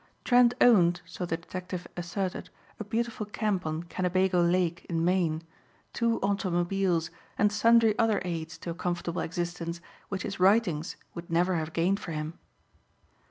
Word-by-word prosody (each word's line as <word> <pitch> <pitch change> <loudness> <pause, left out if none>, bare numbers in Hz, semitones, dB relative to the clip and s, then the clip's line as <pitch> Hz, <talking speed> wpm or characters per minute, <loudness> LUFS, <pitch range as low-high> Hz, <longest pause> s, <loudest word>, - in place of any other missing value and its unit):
Trent 245 -1 +5
owned, 175 -7 +5
so 180 - -5
the 165 - -1
detective 180 +1 -6
asserted, 180 +1 -3 0.3
a - - -3
beautiful 225 0 -2
camp 210 -5 -1
on 155 +2 -3
Kennebago 185 +1 +1
Lake 170 -1 +1
in 165 -1 0
Maine, 170 -3 +1 0.5
two 230 -1 +1
automobiles 185 -3 0 0.3
and 210 0 +3
sundry 225 +1 +5
other 225 -3 +3
aids 165 -2 -4
to 170 - -5
a - - -3
comfortable 175 0 -2
existence 170 0 -3 0.3
which 190 -1 -3
his 195 -3 -5
writings 185 -5 +3 0.2
would 170 0 -8
never 175 +3 +2
have 160 0 -3
gained 180 +5 +1
for 165 - -6
him. 155 +1 -4
180 Hz, 150 wpm, -28 LUFS, 170-200 Hz, 0.5 s, Trent